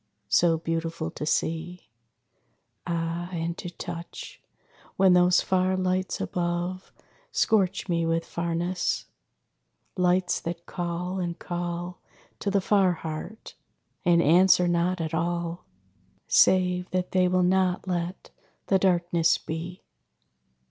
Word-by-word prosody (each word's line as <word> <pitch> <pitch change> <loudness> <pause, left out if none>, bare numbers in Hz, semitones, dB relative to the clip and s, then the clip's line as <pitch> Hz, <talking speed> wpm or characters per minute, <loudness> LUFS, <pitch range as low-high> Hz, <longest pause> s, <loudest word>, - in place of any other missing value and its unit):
So 165 +5 +4
beautiful 165 0 -3
to 150 - -6
see, 165 +3 -2 1.0
Ah, 170 +1 -2
and 170 -1 -3
to 175 - -5
touch! 170 0 -8 0.5
When 190 -1 +5
those 180 0 +5
far 185 0 +1
lights 185 0 -1
above 175 +1 -3 0.4
Scorch 195 -3 +1
me 170 -2 0
with 165 0 0
farness 170 +1 -2 0.9
lights 180 0 +2
that 170 0 -6
call 180 +1 -3
and 175 -2 -3
call 175 0 -5 0.4
To 200 - -1
the 200 0 +2
far 190 -2 +3
heart, 160 +7 -7 0.5
and 170 -1 +4
answer 180 +3 +5
not 175 +1 +1
at 160 -1 -3
all; 170 +1 -2 0.6
Save 180 -1 +3
that 185 -1 -2
they 185 -1 +3
will 180 0 +2
not 185 0 +1
let 175 0 -3 0.3
the 195 - +3
darkness 175 -2 +2
be. 170 +3 -6
175 Hz, 115 wpm, -26 LUFS, 170-185 Hz, 1.0 s, When